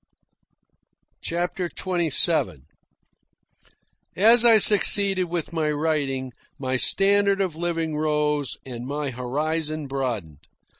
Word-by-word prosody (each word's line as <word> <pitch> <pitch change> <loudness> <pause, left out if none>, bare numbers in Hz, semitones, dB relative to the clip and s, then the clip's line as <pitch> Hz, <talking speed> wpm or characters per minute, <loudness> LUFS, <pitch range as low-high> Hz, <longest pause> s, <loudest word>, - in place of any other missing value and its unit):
CHAPTER 175 +2 -4
XXVII 165 - 0 1.5
As 230 +5 +5
I 230 -2 +6
succeeded 200 -2 +4
with 170 -1 -6
my 160 -2 -1
writing, 145 -4 -3 0.2
my 130 -1 -3
standard 200 +7 +2
of 185 -5 -2
living 165 -2 -3
rose 150 -2 -2
and 125 -1 -8
my 145 0 -4
horizon 155 +5 -4
broadened. 120 - -5
155 Hz, 95 wpm, -22 LUFS, 135-180 Hz, 1.5 s, I